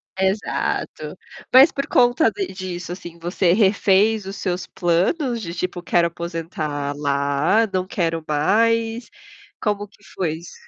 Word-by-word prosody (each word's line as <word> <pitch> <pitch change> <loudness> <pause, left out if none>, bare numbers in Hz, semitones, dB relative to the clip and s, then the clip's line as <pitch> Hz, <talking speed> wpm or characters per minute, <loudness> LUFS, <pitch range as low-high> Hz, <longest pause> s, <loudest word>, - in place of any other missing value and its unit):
Exato. 190 +2 -2 0.4
Mas 270 +5 +8
por 275 - -3
conta 245 +6 +3
de 390 -2 -3
disso, 180 -2 -6
assim, 175 -2 -9
você 175 +1 +1
refez 205 +1 +3
os 195 +1 -6
seus 180 -1 -2
planos 225 - 0
de 170 -3 -5
tipo 180 0 -3
quero 170 -1 +2
aposentar 160 -4 -4
lá, 145 +9 +1
não 185 -1 -1
quero 165 -4 -2
mais, 225 +9 +1 0.5
como 205 -1 -1
que 200 0 -25
foi 165 -5 -1
isso? 170 - -12
185 Hz, 135 wpm, -21 LUFS, 170-220 Hz, 0.5 s, Mas